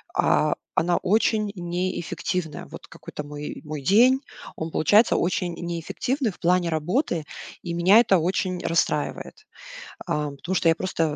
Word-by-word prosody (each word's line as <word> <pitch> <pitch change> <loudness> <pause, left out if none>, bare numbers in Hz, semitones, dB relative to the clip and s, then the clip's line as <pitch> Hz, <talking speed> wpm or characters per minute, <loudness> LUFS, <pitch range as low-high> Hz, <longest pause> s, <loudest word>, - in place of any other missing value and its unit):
а, - - +2 0.2
она 175 +1 +2
очень 215 +1 +1
неэффективная. 175 -2 -3
Вот - - -11
какой-то 150 - -8
мой 145 0 -7
мой 150 -1 -5
день, 240 - +5 0.3
он 160 - -4
получается 205 +10 +4
очень 180 -1 -1
неэффективный 175 - -2
в - - -18
плане 175 0 +2
работы. 170 - -1 0.4
И 170 - -4
меня 185 +6 +6
это 200 -6 +4
очень 180 +2 -1
расстраивает, 430 - -1 0.6
а, 150 -1 -1
потому 155 +6 -5
что 170 - +2
я 165 - +5
просто, 185 -1 -2
175 Hz, 140 wpm, -24 LUFS, 165-200 Hz, 0.6 s, меня